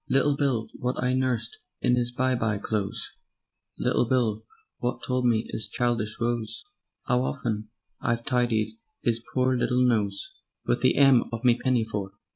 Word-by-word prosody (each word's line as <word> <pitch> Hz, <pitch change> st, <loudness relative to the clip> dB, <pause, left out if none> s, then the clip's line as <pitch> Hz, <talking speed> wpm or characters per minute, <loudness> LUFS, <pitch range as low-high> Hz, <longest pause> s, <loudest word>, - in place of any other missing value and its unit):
Little 140 Hz, +2 st, +3 dB
Bill 135 Hz, -6 st, 0 dB
wot 125 Hz, +1 st, -1 dB
I 125 Hz, 0 st, +1 dB
nussed 130 Hz, -, 0 dB, 0.2 s
in 125 Hz, -1 st, +3 dB
'is 120 Hz, 0 st, 0 dB
by 130 Hz, +1 st, +1 dB
by 110 Hz, -4 st, 0 dB
clothes; 100 Hz, -1 st, -3 dB, 0.6 s
Little -, -, +2 dB
Bill 115 Hz, -5 st, +1 dB, 0.4 s
wot 125 Hz, 0 st, -2 dB
told 125 Hz, -1 st, +1 dB
me 115 Hz, -2 st, +2 dB
'is 110 Hz, -, -3 dB
childish 115 Hz, -3 st, -1 dB
woes; 120 Hz, -2 st, -2 dB, 0.4 s
'Ow 125 Hz, -1 st, +3 dB
often 110 Hz, -5 st, -2 dB, 0.3 s
I've 115 Hz, 0 st, -1 dB
tidied 120 Hz, -4 st, +1 dB, 0.3 s
'is 115 Hz, -1 st, +1 dB
pore 130 Hz, 0 st, +3 dB
little 125 Hz, +1 st, +2 dB
nose 105 Hz, -5 st, 0 dB, 0.3 s
Wiv -, -, +1 dB
the -, -, +4 dB
'em 135 Hz, -4 st, +6 dB
of 115 Hz, +1 st, -4 dB
me 120 Hz, -1 st, +6 dB
pinnyfore. 110 Hz, -6 st, -1 dB
120 Hz, 155 wpm, -27 LUFS, 110-125 Hz, 0.6 s, em